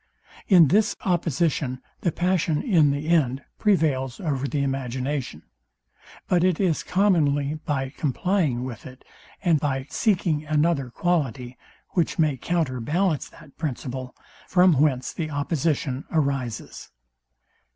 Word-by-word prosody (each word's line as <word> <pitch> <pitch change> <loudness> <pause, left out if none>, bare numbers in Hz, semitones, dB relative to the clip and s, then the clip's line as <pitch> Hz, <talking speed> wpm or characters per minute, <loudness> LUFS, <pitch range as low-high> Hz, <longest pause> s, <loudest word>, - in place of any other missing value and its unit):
In 175 -7 +7
this 210 +2 +3
opposition 165 -7 0 0.2
the 170 - 0
passion 175 -3 0
in 165 - +4
the 145 +2 -2
end 140 -5 +2 0.2
prevails 145 - +1
over 140 -6 -2
the 140 0 -1
imagination; 130 - -3 0.8
but 175 -1 +2
it 185 -3 +2
is 180 -6 +1
commonly 155 -7 +1
by 135 -3 -1
complying 150 -3 0
with 125 -2 -7
it, 130 0 -14 0.4
and 170 -5 +3
by 135 -2 -1
seeking 170 -7 +1
another 155 -3 +1
quality, 130 -5 -1 0.3
which 175 -3 0
may 155 -4 +2
counter 145 -2 -1
ballance 155 +6 0
that 140 - -17
principle, 130 -4 -4 0.3
from 180 -1 +5
whence 130 -4 +1
the 155 -2 -3
opposition 145 -2 -1
arises. 140 -8 -2
150 Hz, 120 wpm, -24 LUFS, 130-170 Hz, 0.8 s, In